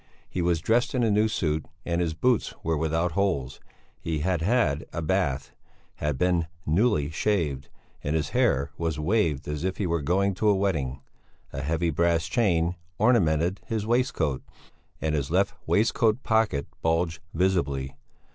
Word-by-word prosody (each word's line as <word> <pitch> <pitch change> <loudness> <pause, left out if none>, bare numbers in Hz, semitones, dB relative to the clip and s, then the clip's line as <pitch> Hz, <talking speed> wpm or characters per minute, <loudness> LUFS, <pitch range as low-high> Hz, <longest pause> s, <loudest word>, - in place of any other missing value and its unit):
He 90 - -3
was 85 -1 +1
dressed 120 - +1
in 125 - +2
a 110 - +3
new 105 +2 +3
suit, 80 -7 -1 0.2
and 85 0 0
his 80 -2 -1
boots 125 +6 +1
were 80 0 +1
without 80 +3 0
holes; 80 -9 -1 0.4
he 80 -3 -2
had 90 0 0
had 95 - +2
a - - -4
bath, 80 -5 0 0.5
had 75 -3 -1
been 85 0 +1 0.2
newly 80 -3 +2
shaved, 80 -8 -1 0.3
and 75 +2 -1
his 75 -1 0
hair 75 - +1
was 80 -2 -1
waved 80 -5 +1
as 75 +1 -3
if 95 0 -1
he 100 - -1
were 85 -2 0
going 95 +6 +1
to 105 +3 +1
a 100 - +4
wedding. 75 -10 -1 0.5
A 70 - -3
heavy 80 +3 0
brass 85 +1 +2
chain 85 -3 +1 0.2
ornamented 90 -6 +2
his 110 -2 -2
waistcoat, 110 - 0 0.6
and 80 -1 -1
his 70 -3 -1
left 95 +4 +2
waistcoat 115 +2 +2
pocket 110 -11 +1 0.2
bulged 80 0 0 0.2
visibly. 70 -7 0
85 Hz, 160 wpm, -26 LUFS, 75-100 Hz, 0.6 s, a